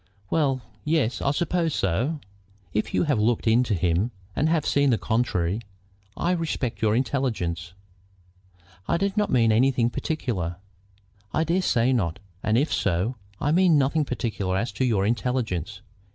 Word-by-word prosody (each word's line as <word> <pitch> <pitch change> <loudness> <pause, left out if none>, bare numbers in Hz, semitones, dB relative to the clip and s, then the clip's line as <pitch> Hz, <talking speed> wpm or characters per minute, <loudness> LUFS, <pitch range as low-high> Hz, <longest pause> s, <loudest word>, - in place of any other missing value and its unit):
"Well, 135 -5 +1 0.2
yes; 150 -6 +1
I - - -1
should 140 - +2
suppose 170 -1 0
so." 125 - 0 0.5
"If 105 - -1
you - - +3
have 145 -8 +1
looked 115 +2 +1
into 115 -1 +3
him 90 +5 +1 0.3
and 155 - +2
have 160 -3 +1
seen 140 0 +3
the 120 - +3
contrary, 110 -5 0 0.6
I 175 - +1
respect 160 -10 -2
your 110 -1 +3
intelligence." 110 - -1 1.1
"I 170 - +2
did 195 +2 -1
not 210 -1 +1
mean 115 -3 +4
anything 120 +1 +3
particular." 110 - -2 0.8
"I 160 - +3
dare 170 +4 +1
say 125 -6 +2
not, 90 -9 0 0.2
and 110 +1 +1
if 145 +5 +1
so, 100 +6 0 0.2
I 145 - +1
mean 175 -1 +5
nothing 145 +3 +2
particular 105 -8 -2
as 110 +3 -1
to 115 +6 -1
your 105 -6 +2
intelligence. 110 - -1
125 Hz, 155 wpm, -25 LUFS, 105-150 Hz, 1.1 s, mean